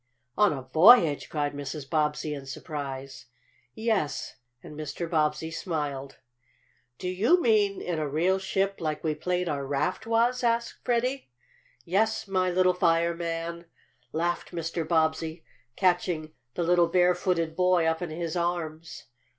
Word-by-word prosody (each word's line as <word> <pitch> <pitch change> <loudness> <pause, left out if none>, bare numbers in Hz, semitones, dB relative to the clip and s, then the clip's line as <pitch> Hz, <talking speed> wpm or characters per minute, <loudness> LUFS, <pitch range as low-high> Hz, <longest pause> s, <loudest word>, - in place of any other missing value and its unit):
"On 210 -1 +4
a 135 -3 -4
voyage?" 160 - +6
cried 145 -2 -1
Mrs. 145 0 -6
Bobbsey 150 0 0
in 140 -2 -7
surprise. 135 -1 -6 0.5
"Yes," 220 -10 -1 0.3
and 150 - -10
Mr. 155 +3 -5
Bobbsey 155 -1 0
smiled. 145 -6 -4 0.8
"Do 180 - -5
you 210 - +3
mean 210 - +2
in 170 -3 -2
a 155 - -1
real 175 +6 +1
ship, 195 +1 -1
like 155 -2 -2
we 155 -2 +1
played 180 +3 -2
our 145 -3 -2
raft 145 +10 -2
was?" 235 +2 +2
asked 235 0 0
Freddie. 250 - -1 0.6
"Yes, 220 +5 +1
my 185 -1 +1
little 185 0 +3
fireman!" 170 -1 0 0.5
laughed 175 +2 -2
Mr. 165 -1 -3
Bobbsey, 160 0 0 0.3
catching 175 -4 0 0.2
the 175 - -1
little 175 0 +4
bare 180 +1 +4
footed 170 -3 -1
boy 180 -2 +3
up 160 +1 0
in 175 - -3
his 165 +1 -4
arms. 170 -2 -3
170 Hz, 140 wpm, -27 LUFS, 155-185 Hz, 0.8 s, voyage